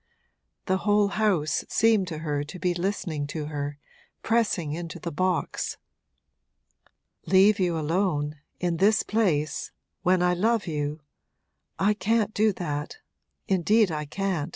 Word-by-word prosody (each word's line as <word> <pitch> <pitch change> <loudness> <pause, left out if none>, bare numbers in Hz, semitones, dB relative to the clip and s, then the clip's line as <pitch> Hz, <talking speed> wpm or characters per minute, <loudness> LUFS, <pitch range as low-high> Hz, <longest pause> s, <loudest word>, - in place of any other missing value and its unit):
The 190 - +1
whole 205 +1 +2
house 200 -8 +1
seemed 220 -4 +3
to 165 -3 -5
her 145 -1 -1
to 150 +5 -9
be 180 0 0
listening 175 -5 -2
to 150 +1 -4
her, 145 -1 -4 0.5
pressing 205 -9 +1
into 170 +1 -5
the 170 +1 -5
box. 185 +4 -1 1.5
'Leave 195 +2 +5
you 175 -3 +1
alone 155 -2 0 0.2
in 175 -2 0
this 210 +5 +4
place 175 -9 0 0.3
when 180 -1 +3
I 180 0 +3
love 220 +4 +1
you? 150 -2 -3 0.8
I 200 +2 +3
can't 215 +1 0
do 215 +1 +3
that 150 - -4 0.5
indeed 195 +2 +3
I 150 -1 -3
can't.' 175 -1 -2
180 Hz, 130 wpm, -26 LUFS, 155-205 Hz, 1.5 s, Leave